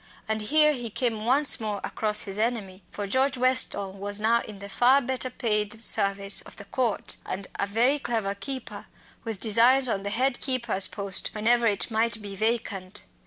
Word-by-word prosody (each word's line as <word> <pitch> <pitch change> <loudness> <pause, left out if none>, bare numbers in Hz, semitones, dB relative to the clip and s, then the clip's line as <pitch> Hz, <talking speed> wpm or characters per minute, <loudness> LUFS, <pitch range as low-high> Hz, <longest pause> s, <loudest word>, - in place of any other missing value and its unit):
And 220 0 -2
here 300 +7 +3
he 240 -4 -5
came 220 -1 -2
once 275 +4 +4
more 210 -2 -3
across 215 -1 0
his 195 0 -4
enemy. 215 -5 -2
For 205 - -6
George 260 +6 +1
Westall 255 -6 +2
was 200 +1 -2
now 230 +2 +2
in 210 - -10
the 200 0 -9
far 245 +7 +4
better 260 -1 -4
paid 215 -2 -1
service 200 -1 +3
of - - -11
the 200 - -11
Court 235 0 -3
and 195 +1 -6
a 200 - 0
very 240 +8 +1
clever 220 -7 -2
keeper, 255 +6 -6 0.4
with 225 -4 -5
designs 240 +5 +4
on 200 -4 -1
the 200 - -4
head 250 +4 0
keeper's 235 -8 +2
post 200 -2 -4
whenever 230 +2 +2
it 210 +2 0
might 220 0 0
be 200 -2 -8
vacant. 210 -3 -2
220 Hz, 180 wpm, -25 LUFS, 200-245 Hz, 0.4 s, once